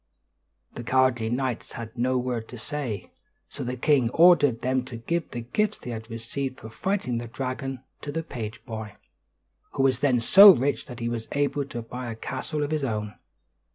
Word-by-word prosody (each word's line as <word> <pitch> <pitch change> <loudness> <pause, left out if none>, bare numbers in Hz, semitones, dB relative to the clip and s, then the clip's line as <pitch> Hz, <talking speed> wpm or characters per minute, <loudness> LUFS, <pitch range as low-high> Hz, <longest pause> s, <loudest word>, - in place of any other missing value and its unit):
The 120 - -7
cowardly 125 -2 +2
knights 125 -1 -2
had 115 0 -7
no 125 +1 +1
word 125 -3 -2
to 125 - -9
say. 120 - -5 0.4
So - - -6
the 125 +1 -3
king 135 -3 +3
ordered 145 -6 +5
them 130 0 +1
to 130 -2 -8
give 165 +9 -2
the 120 - -5
gifts 210 - 0
they 125 - -7
had 110 0 -7
received 130 +4 -4
for 110 - -10
fighting 140 - -1
the 120 - -6
dragon 130 +1 -4 0.2
to 145 - -5
the 165 +2 -3
page 115 -7 -7
boy, 110 -3 -6 0.8
who 135 - +1
was 135 -1 +3
then 130 -4 +3
so 195 - +9
rich 135 +4 -1
that 125 -2 -9
he 115 - -1
was 115 -1 -3
able 145 0 0
to 120 -4 -6
buy 125 +1 -6
a - - -6
castle 140 +6 -3
of 145 - -3
his 155 -2 0
own. 105 -4 -2
125 Hz, 190 wpm, -26 LUFS, 115-140 Hz, 0.8 s, so